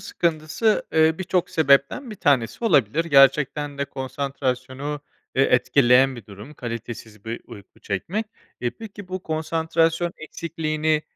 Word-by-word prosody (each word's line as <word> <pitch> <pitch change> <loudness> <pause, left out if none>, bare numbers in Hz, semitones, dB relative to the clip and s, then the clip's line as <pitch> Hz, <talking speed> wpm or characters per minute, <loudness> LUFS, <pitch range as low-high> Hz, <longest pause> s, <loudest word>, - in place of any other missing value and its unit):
sıkıntısı, 170 +6 0
eee, 160 0 +4
birçok 185 -1 0
sebepten 140 - +2
bir - - -6
tanesi 140 - +1
olabilir. 150 - +3
Gerçekten 140 0 +3
de 140 - 0
konsantrasyonu, 135 +1 -4 0.3
eee, 135 - +4
etkileyen 125 0 +4
bir 115 - -11
durum 105 +8 -11
kalitesiz 115 -4 -7
bir 115 +1 -5
uyku 100 -2 -14
çekmek. 180 - -3 0.3
Eee, 120 - 0
peki 205 -3 -10
bu 185 0 -5
konsantrasyon 165 +1 0
eksikliğini, 155 -1 -2
145 Hz, 125 wpm, -23 LUFS, 130-165 Hz, 0.3 s, eee